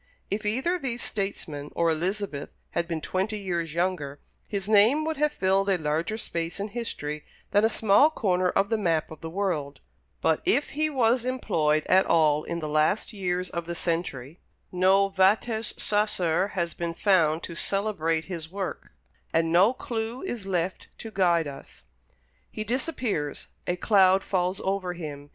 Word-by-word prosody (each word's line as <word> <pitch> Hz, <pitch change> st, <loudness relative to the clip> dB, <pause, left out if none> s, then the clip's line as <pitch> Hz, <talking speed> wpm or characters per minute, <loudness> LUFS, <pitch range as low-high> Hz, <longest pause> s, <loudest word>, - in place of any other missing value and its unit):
If 210 Hz, +1 st, -1 dB
either 265 Hz, +12 st, 0 dB
these 245 Hz, -5 st, -3 dB
statesmen 160 Hz, -8 st, -4 dB
or 170 Hz, -1 st, +3 dB
Elizabeth 175 Hz, -2 st, -2 dB, 0.2 s
had 170 Hz, 0 st, -1 dB
been 165 Hz, -3 st, -3 dB
twenty 195 Hz, +6 st, -1 dB
years 170 Hz, -5 st, -3 dB
younger, 170 Hz, -6 st, -1 dB, 0.3 s
his 200 Hz, -2 st, -3 dB
name 220 Hz, +9 st, +5 dB
would 320 Hz, -1 st, -2 dB
have 300 Hz, +1 st, +2 dB
filled 195 Hz, -2 st, +1 dB
a 190 Hz, -, +3 dB
larger 160 Hz, +7 st, -1 dB
space 170 Hz, -4 st, -4 dB
in 205 Hz, +2 st, -3 dB
history 150 Hz, -10 st, -4 dB, 0.3 s
than 205 Hz, -, +4 dB
a 225 Hz, -, +5 dB
small 220 Hz, +6 st, +5 dB
corner 185 Hz, -, +1 dB
of 195 Hz, +2 st, +1 dB
the 225 Hz, -1 st, +1 dB
map 165 Hz, -6 st, 0 dB
of 160 Hz, -, -10 dB
the 160 Hz, -, -5 dB
world; 165 Hz, -6 st, -2 dB, 0.4 s
but, -, -, +2 dB
if 350 Hz, -6 st, +1 dB
he 310 Hz, +2 st, 0 dB
was 245 Hz, -3 st, +2 dB
employed 155 Hz, -12 st, +1 dB
at 190 Hz, +1 st, +4 dB
all 155 Hz, -2 st, +3 dB
in 170 Hz, -, -3 dB
the 155 Hz, -, -3 dB
last 155 Hz, +9 st, +1 dB
years 180 Hz, -2 st, -2 dB
of 170 Hz, -1 st, -4 dB
the 170 Hz, -, -3 dB
century, 165 Hz, -4 st, -3 dB, 0.3 s
no 190 Hz, +2 st, +4 dB
vates 210 Hz, +4 st, +1 dB
sacer 190 Hz, -4 st, +1 dB
has 170 Hz, -2 st, -1 dB
been 170 Hz, -1 st, -4 dB
found 165 Hz, -6 st, +3 dB
to -, -, -6 dB
celebrate 165 Hz, -4 st, -1 dB
his 165 Hz, -3 st, -6 dB
work, 195 Hz, -1 st, -5 dB, 0.4 s
and 165 Hz, 0 st, +2 dB
no 185 Hz, +7 st, +6 dB
clew 230 Hz, -1 st, -4 dB
is 240 Hz, -, -4 dB
left 180 Hz, -1 st, -2 dB
to 225 Hz, -, -8 dB
guide 175 Hz, -5 st, +3 dB
us. 140 Hz, -1 st, -10 dB, 0.7 s
He 215 Hz, -, -5 dB
disappears; 230 Hz, -, -2 dB, 0.2 s
a 175 Hz, -, +1 dB
cloud 190 Hz, 0 st, +4 dB
falls 185 Hz, 0 st, 0 dB
over 190 Hz, -2 st, -1 dB
him. 145 Hz, -4 st, -7 dB
185 Hz, 165 wpm, -27 LUFS, 165-215 Hz, 0.7 s, no